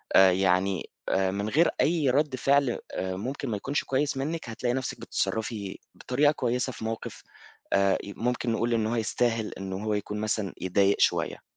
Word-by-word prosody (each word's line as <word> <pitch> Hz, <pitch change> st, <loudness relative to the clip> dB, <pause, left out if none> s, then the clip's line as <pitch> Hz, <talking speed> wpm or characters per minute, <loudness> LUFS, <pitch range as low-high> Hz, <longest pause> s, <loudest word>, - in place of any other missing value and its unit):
آآ 95 Hz, -1 st, +8 dB
يعني، 95 Hz, 0 st, +1 dB, 0.2 s
آآ 95 Hz, 0 st, +2 dB
من 100 Hz, +2 st, -2 dB
غير 160 Hz, +8 st, +4 dB
أي 155 Hz, -5 st, +2 dB
رد 140 Hz, +1 st, +2 dB
فعل 140 Hz, -1 st, +2 dB
آآ 95 Hz, 0 st, -3 dB
ممكن 130 Hz, +4 st, -4 dB
ما 105 Hz, -, -1 dB
يكونش 140 Hz, +8 st, -1 dB
كويس 135 Hz, +1 st, 0 dB
منك، 155 Hz, -1 st, -3 dB
هتلاقي 120 Hz, +2 st, -1 dB
نفْسِك 130 Hz, 0 st, -3 dB
بتتصرفي 110 Hz, -3 st, -2 dB, 0.2 s
بطريقة 145 Hz, +4 st, +2 dB
كويسة 125 Hz, -1 st, -1 dB
في 110 Hz, -, -7 dB
موقف 115 Hz, 0 st, -5 dB, 0.5 s
آآ 100 Hz, 0 st, +4 dB
ممكن 120 Hz, +4 st, -2 dB
نقول 115 Hz, +1 st, 0 dB
إن 110 Hz, -1 st, +1 dB
هو 120 Hz, -, -1 dB
يستاهل 115 Hz, 0 st, 0 dB
إن 95 Hz, -1 st, -4 dB
هو 105 Hz, +3 st, -2 dB
يكون 105 Hz, +1 st, -3 dB
مثلًا 105 Hz, -3 st, -1 dB
يضايق 100 Hz, +2 st, +3 dB
شوية. -, -, +1 dB
115 Hz, 170 wpm, -27 LUFS, 100-130 Hz, 0.5 s, آآ